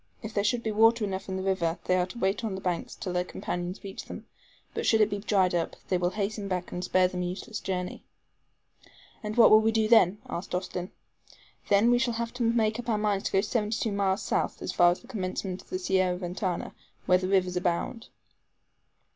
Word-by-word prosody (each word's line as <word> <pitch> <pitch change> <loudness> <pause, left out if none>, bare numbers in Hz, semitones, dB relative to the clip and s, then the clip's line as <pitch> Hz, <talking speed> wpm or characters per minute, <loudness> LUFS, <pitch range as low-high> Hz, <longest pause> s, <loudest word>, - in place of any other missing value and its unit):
If 220 0 -6
there 200 - +1
should 235 +3 +1
be 220 - -1
water 225 +2 +4
enough 190 -1 -4
in 190 - -2
the 190 - -3
river, 175 -4 0
they 185 - +2
are 180 -1 +1
to 190 - -10
wait 195 +1 0
on 210 -4 -2
the - - -5
banks 175 -3 -3
till 180 - -5
their 180 0 +1
companions 180 +1 -5
reach 195 -1 -7
them; - - -9 0.5
but - - -3
should 220 - +3
it 215 -1 +4
be 205 - -2
dried 195 -3 +2
up, 170 -1 -1
they 185 - +2
will 175 0 +1
hasten 205 +1 -3
back 180 -2 -3
and 180 - -4
spare 185 0 +3
them 180 0 -4
a - - -1
useless 200 +4 -5
journey." 180 -1 -4 1.2
"And 215 +1 -5
what 235 - +8
will 215 - +9
we 220 +1 +2
do 220 -1 +2
then?" 210 -4 +5
asked 180 +1 -4
Austin. 180 0 -3 0.8
"Then 205 +4 +5
we 245 - +4
shall 240 -2 0
have 230 0 -3
to 245 - -6
make 225 -1 +2
up 240 0 -5
our 220 - +2
minds 210 -2 0
to - - -1
go 195 - +3
seventy 215 0 -1
two 220 - -1
miles 200 0 0
south, - - -1
as - - -2
far 175 -1 +6
as 175 - -1
the 240 - -17
commencement 185 -4 -4
of - - -24
the - - -2
Sierra 185 -1 +1
Ventana, 180 0 -3 0.3
where 180 0 +4
rivers 185 -1 +1
abound." 180 +6 -1
195 Hz, 225 wpm, -28 LUFS, 180-220 Hz, 1.2 s, will